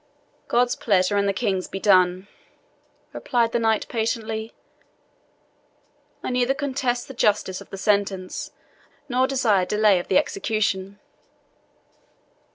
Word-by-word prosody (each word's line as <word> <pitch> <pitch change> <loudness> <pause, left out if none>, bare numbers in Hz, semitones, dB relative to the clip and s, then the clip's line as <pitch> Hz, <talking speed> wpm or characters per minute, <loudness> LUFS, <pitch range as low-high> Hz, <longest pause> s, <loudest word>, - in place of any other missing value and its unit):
"God's 245 +1 +2
pleasure 195 -2 +1
and 200 0 +2
the - - +3
King's 195 -3 -1
be 195 - -6
done," 185 -1 +3 0.9
replied 235 -3 0
the 235 - 0
knight 225 -1 +1
patiently. 225 -1 -3 1.7
"I - - -3
neither 250 +2 +1
contest 260 -4 -2
the 270 - -9
justice 205 -5 0
of - - -14
the 195 - -7
sentence, 195 -2 -1 0.6
nor 255 0 +1
desire 235 -8 +2
delay 210 -3 +3
of 175 - -7
the 185 - +3
execution." 200 -1 -1
215 Hz, 120 wpm, -23 LUFS, 195-240 Hz, 1.7 s, the